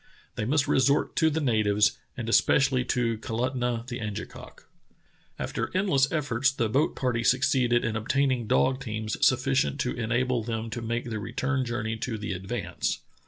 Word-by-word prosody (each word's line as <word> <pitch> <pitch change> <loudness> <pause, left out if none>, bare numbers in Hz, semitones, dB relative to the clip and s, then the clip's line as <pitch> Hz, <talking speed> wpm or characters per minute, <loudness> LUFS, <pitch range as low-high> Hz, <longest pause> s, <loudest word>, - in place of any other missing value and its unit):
They 105 - -3
must 140 +4 +1
resort 140 +3 +2
to 160 - +4
the 160 +1 -1
natives, 110 -6 +2 0.2
and - - -4
es - - +5
pecially 130 -2 +2
to 115 -3 0
Kalutunah 120 +1 -2
the 125 -1 -5
Angekok. 105 -2 -7 0.7
After - - -3
endless 140 -9 +2
efforts 135 -4 +1
the 120 -3 -1
boat 135 +8 +1
party 120 -3 -1
succeeded 125 -2 +2
in 110 -1 -1
ob 110 +1 -5
taining 130 -4 +1
dog 130 +5 +2
teams 110 -2 -4
sufficient 70 - +2
to - - -1
enable 120 +1 0
them 115 0 -4
to 120 - -4
make 115 +1 -3
the 110 - -2
return 130 +6 -2
journey 115 -2 -3
to 115 0 -3
the 105 -1 -4
Advance. 95 +5 -3
120 Hz, 165 wpm, -27 LUFS, 110-130 Hz, 0.7 s, es